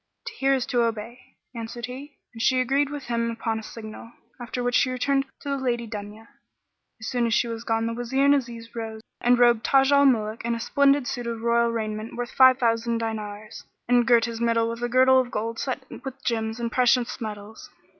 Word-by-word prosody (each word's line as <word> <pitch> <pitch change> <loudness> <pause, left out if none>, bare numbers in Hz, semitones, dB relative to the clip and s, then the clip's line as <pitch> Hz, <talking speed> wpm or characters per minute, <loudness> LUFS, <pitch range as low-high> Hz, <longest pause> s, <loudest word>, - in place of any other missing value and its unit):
"To 455 - -6
hear 275 -10 +2
is 255 -2 -1
to 245 - +1
obey" 230 +1 -4 0.2
answered 235 0 -6
he; 270 +4 -10 0.2
and 225 - -7
she 255 +2 +3
agreed 270 +3 +1
with 290 -1 -6
him 235 -1 -1
upon 225 -1 -2
a - - -10
signal, 220 +1 -10 0.3
after 245 +1 -4
which 245 0 0
she 255 - +3
returned 270 +2 0
to 285 - -6
the 275 - 0
Lady 240 -3 -1
Dunya. 210 0 -8 0.7
As 220 - -8
soon 245 -1 0
as 225 - +1
she 235 - +2
was 230 0 -5
gone, 225 -1 0
the 230 - -2
Wazir 245 +4 0
and 280 - +6
Aziz 235 -4 -3
rose 220 -1 -5 0.2
and 245 0 +4
robed 240 -2 +4
Taj 270 0 +4
al 280 0 +6
Muluk 220 -3 0
in 235 0 -1
a - - -5
splendid 280 +3 +3
suit 245 -1 -4
of 230 -1 -4
royal 235 0 +3
raiment 215 -1 -4
worth 245 0 -4
five 260 -1 +6
thousand 230 -2 +1
diners, 215 -2 -5 0.2
and 245 -1 +3
girt 235 -2 +5
his 230 -1 -5
middle 230 -1 +1
with 230 +1 -7
a 240 - -1
girdle 260 +1 +5
of 255 -1 -1
gold 225 0 -3
set 260 0 -3 0.2
with 270 0 -8
gems 225 -1 -1
and 235 -1 -3
precious 250 0 +2
metals. 215 0 -8
235 Hz, 215 wpm, -25 LUFS, 225-255 Hz, 0.7 s, and